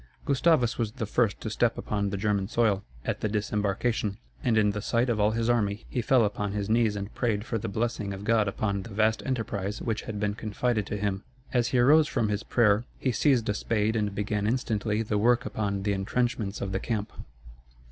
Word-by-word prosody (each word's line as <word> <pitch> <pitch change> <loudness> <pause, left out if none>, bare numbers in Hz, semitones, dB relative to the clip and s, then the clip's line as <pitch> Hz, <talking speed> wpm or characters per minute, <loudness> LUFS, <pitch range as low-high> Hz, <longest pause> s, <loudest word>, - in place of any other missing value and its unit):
Gustavus 140 -4 +2
was 110 -2 -1
the 125 -4 -3
first 105 -1 +1
to 110 - -3
step 115 +1 +1
upon 100 -1 -1
the 100 - -3
German 100 -1 0
soil, 105 -3 +1 0.2
at - - -2
the 110 - 0
disembarkation; 105 0 -1 0.3
and 120 -5 +2
in 105 -1 +4
the 105 +1 -4
sight 120 +3 +1
of 110 - -1
all 105 0 +4
his 115 +1 -1
army 110 -3 +1
he 125 - -1
fell 120 0 +4
upon 105 -1 -2
his 105 0 -2
knees 115 -2 +3
and 100 +1 -5
prayed 110 -3 -1
for 115 - -2
the - - -4
blessing 110 -1 -2
of 100 0 -6
God 110 -1 +2
upon 100 0 -1
the 95 - -9
vast 110 +1 +1
enterprise 105 -5 -2
which 110 -2 -2
had 105 -2 -5
been 105 0 0
confided 110 +1 -1
to 105 - -3
him. 100 -1 -1 0.3
As 120 -2 +2
he 130 - 0
arose 150 +5 +6
from 110 -7 0
his 105 0 -1
prayer, 110 -2 +3
he 130 - 0
seized 125 -2 +2
a 105 - +1
spade 110 +1 0
and 105 -2 -1
began 105 0 -1
instantly 110 -2 0
the 105 -1 -1
work 120 +3 +3
upon 100 -4 -2
the 100 0 +1
intrenchments 105 +1 -1
of 95 - -2
the 95 - -1
camp. 105 -2 -3
110 Hz, 215 wpm, -27 LUFS, 100-115 Hz, 0.3 s, arose